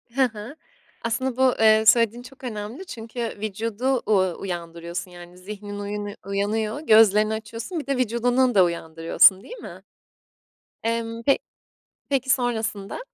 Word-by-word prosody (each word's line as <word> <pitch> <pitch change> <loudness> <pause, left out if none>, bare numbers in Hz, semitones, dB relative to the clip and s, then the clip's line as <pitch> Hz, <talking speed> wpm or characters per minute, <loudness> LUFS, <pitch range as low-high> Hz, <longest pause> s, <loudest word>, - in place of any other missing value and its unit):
Hı 270 - +2
hı. 225 +4 -7 0.5
Aslında 250 +2 -2
bu, 260 -1 +3
eee, 220 0 +5
söylediğin 230 +1 +4
çok 270 +1 -15
önemli 225 - -6
çünkü 230 -5 -8 0.2
vücudu 230 +5 -1
u 190 -4 +1
uyandırıyorsun. 170 -1 -5
Yani, 175 0 -13
zihnin 205 +2 -8
uyan 205 0 -5
uyanıyor, 210 +5 -1
gözlerini 215 -4 +5
açıyorsun, 230 - -5
bir 285 - -8
de 275 -2 0
vücudunun 245 +1 +1
da 190 - +7
uyandırıyorsun, 170 +2 +3
değil - - -10
mi? - - -11 1.0
Emm, 230 0 -2
pe 275 - +4 0.7
peki 265 -2 0
sonrasında? 225 - -1
220 Hz, 135 wpm, -24 LUFS, 200-245 Hz, 1.0 s, da